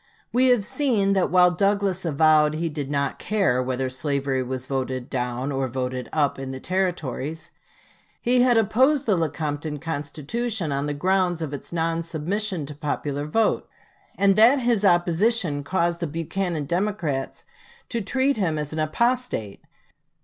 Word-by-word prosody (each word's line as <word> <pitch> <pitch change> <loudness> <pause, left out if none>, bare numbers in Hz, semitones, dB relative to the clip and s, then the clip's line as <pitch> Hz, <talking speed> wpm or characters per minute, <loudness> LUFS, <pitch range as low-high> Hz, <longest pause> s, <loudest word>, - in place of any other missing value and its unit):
We 255 +2 +4
have 245 -5 +3
seen 215 -8 +1
that 190 -2 +2
while 180 0 +5
Douglas 195 0 0
avowed 155 0 +4
he 165 +1 -1
did 145 -3 -5
not 140 -1 -1
care 195 -12 +1
"whether 130 +1 -1
slavery 135 0 -1
was 130 0 -4
voted 130 -1 -3
down 125 +1 -2
or 135 -1 -1
voted 125 0 -4
up" 145 -3 +1
in 135 -1 -5
the 130 0 -5
Territories, 165 -4 -2 0.7
he 245 +1 +2
had 245 -2 +4
opposed 260 +7 +3
the 210 - +3
Lecompton 150 -2 -2
Constitution 160 - -3
on 140 +1 -1
the 145 - -2
ground 180 +2 +1
of 155 -3 -4
its 145 - -8
non 165 0 0
submission 170 +2 -2
to 150 - -8
popular 145 0 -3
vote, 225 +8 +1 0.5
and 195 -1 +4
that 240 +4 +6
this 235 -4 +2
opposition 175 -2 +2
caused 170 +1 0
the 170 - -2
Buchanan 165 +1 -3
Democrats 170 -6 -2 0.4
to 235 - -2
treat 265 +5 +1
him 170 -7 0
as 150 0 -4
an 155 - -3
apostate. 235 - -1
165 Hz, 155 wpm, -24 LUFS, 145-200 Hz, 0.7 s, that